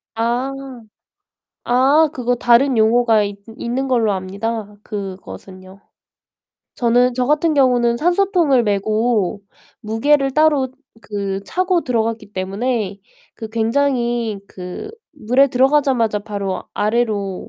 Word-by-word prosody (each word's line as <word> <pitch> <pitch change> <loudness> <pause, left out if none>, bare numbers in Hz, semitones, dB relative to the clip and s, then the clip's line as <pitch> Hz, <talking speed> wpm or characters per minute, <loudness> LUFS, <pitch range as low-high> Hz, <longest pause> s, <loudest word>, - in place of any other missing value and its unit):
아. 240 +4 -1 1.2
아 275 +6 +4
그거 245 -1 -1
다른 240 +2 +3
용어가 220 -1 +3
있 200 0 -5 0.2
있는 255 +3 -2
걸로 225 -5 +2
압니다 205 +3 -4
그것은요. 190 -1 -9 0.9
저는 245 +1 +2
저 250 0 0
같은 305 +2 +2
경우는 245 -3 +3
산소통을 350 - +2
메고 210 -1 0 0.4
무게를 270 +5 +1
따로 300 -3 +3 0.3
그 200 -2 -4
차고 365 - 0
들어갔기 225 -3 -2
때문에 200 +1 -2 0.4
그 220 - -7
굉장히 235 -1 0
그 180 - -8 0.2
물에 270 0 +2
들어가자마자 260 -4 +2
바로 200 -2 -4
아래로 210 -3 -1
235 Hz, 235 characters per minute, -19 LUFS, 205-265 Hz, 1.2 s, 아